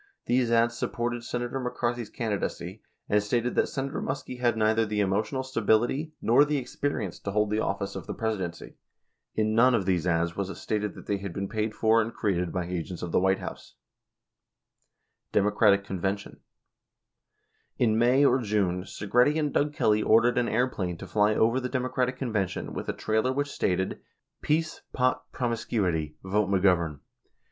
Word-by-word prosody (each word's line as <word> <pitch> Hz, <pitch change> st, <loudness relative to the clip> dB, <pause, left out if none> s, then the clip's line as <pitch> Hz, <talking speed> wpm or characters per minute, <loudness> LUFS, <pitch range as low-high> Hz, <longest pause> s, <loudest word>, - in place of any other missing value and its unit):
98 120 Hz, -, +2 dB
These 120 Hz, -2 st, 0 dB
ads 115 Hz, 0 st, +3 dB
sup -, -, -2 dB
ported 120 Hz, 0 st, -2 dB
Senator 120 Hz, +2 st, -3 dB
McCarthy's 120 Hz, -2 st, -2 dB
candidacy, 100 Hz, -4 st, -3 dB, 0.3 s
and 105 Hz, 0 st, +3 dB
stated 120 Hz, +4 st, 0 dB
that -, -, +2 dB
Senator 135 Hz, 0 st, -3 dB
Muskie 130 Hz, -2 st, -4 dB
had 120 Hz, -2 st, +2 dB
neither 110 Hz, +1 st, +3 dB
the 105 Hz, -1 st, -2 dB
emotional 105 Hz, +7 st, 0 dB
stability 125 Hz, +5 st, +1 dB
nor 120 Hz, +5 st, +5 dB
the 150 Hz, 0 st, 0 dB
experience 125 Hz, -6 st, -3 dB
to -, -, -5 dB
hold 105 Hz, +1 st, +1 dB
the 105 Hz, -, +1 dB
of -, -, -1 dB
fice 100 Hz, 0 st, -5 dB
of 95 Hz, -, -7 dB
the -, -, -3 dB
Presidency. 95 Hz, -7 st, -4 dB, 0.6 s
In 110 Hz, 0 st, +1 dB
none 120 Hz, +3 st, +5 dB
of 100 Hz, -, 0 dB
these 90 Hz, -2 st, +1 dB
ads 85 Hz, 0 st, +1 dB
was 100 Hz, -1 st, -2 dB
it -, -, -6 dB
stated 105 Hz, -1 st, -2 dB
that -, -, -11 dB
they 100 Hz, -, 0 dB
had 100 Hz, -2 st, -6 dB
been 100 Hz, 0 st, -3 dB
paid 110 Hz, 0 st, -2 dB
for 115 Hz, +1 st, +4 dB
and 115 Hz, +1 st, -3 dB
created 90 Hz, -5 st, 0 dB
by 90 Hz, -2 st, -2 dB
agents 90 Hz, 0 st, -5 dB
of 85 Hz, -, -4 dB
the -, -, +3 dB
White 95 Hz, +1 st, +3 dB
House. -, -, -8 dB, 1.6 s
Democratic 105 Hz, 0 st, +3 dB
Convention: 95 Hz, +1 st, -3 dB, 1.4 s
In 110 Hz, -3 st, +3 dB
May 125 Hz, +5 st, +4 dB
or 135 Hz, -, +4 dB
June, 100 Hz, -5 st, 0 dB
Segretti 125 Hz, +11 st, +2 dB
and 150 Hz, -3 st, 0 dB
Doug 145 Hz, +1 st, +2 dB
Kelly 110 Hz, -7 st, +2 dB
ordered 115 Hz, +3 st, +4 dB
an 120 Hz, -, 0 dB
airplane 95 Hz, -9 st, -1 dB
to -, -, -8 dB
fly 105 Hz, 0 st, +2 dB
over 115 Hz, +3 st, +3 dB
the 125 Hz, -1 st, -3 dB
Democratic 125 Hz, 0 st, -1 dB
Convention 105 Hz, -8 st, -2 dB
with -, -, -5 dB
a -, -, 0 dB
trailer 110 Hz, +4 st, 0 dB
which 145 Hz, +2 st, -1 dB
stated, 95 Hz, +1 st, -1 dB, 0.4 s
"Peace, 155 Hz, +1 st, 0 dB
Pot, 130 Hz, 0 st, 0 dB
Promiscuity. 100 Hz, -, -1 dB
Vote 100 Hz, +1 st, 0 dB
McGovern." 90 Hz, -6 st, +2 dB
110 Hz, 175 wpm, -27 LUFS, 100-125 Hz, 1.6 s, nor